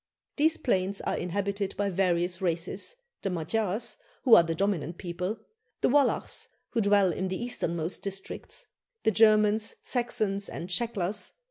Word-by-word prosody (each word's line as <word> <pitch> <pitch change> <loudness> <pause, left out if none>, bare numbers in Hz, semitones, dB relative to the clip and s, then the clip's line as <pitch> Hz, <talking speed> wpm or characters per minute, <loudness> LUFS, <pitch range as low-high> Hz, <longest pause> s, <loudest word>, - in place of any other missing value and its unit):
These 315 +2 +3
plains 195 -4 0
are - - -1
inhabited 200 +2 -2
by 205 -1 +1
various 180 0 +1
races 185 - -2 0.3
the 195 - -1
Magyars, 195 +5 -1 0.3
who 250 - +5
are 220 - +11
the 165 -1 -2
dominant 175 -3 -1
people; 180 +4 -3 0.4
the - - +3
Wallachs, 285 +1 +2 0.2
who 230 - +1
dwell 200 -3 +4
in 190 +4 -2
the 185 0 -3
easternmost 170 -8 -2
districts; 195 -1 -5 0.4
the 220 - +4
Germans, 215 0 +4
Saxons, 215 -5 0
and 175 - -6
Shecklers. 205 -1 0
195 Hz, 140 wpm, -28 LUFS, 180-215 Hz, 0.4 s, are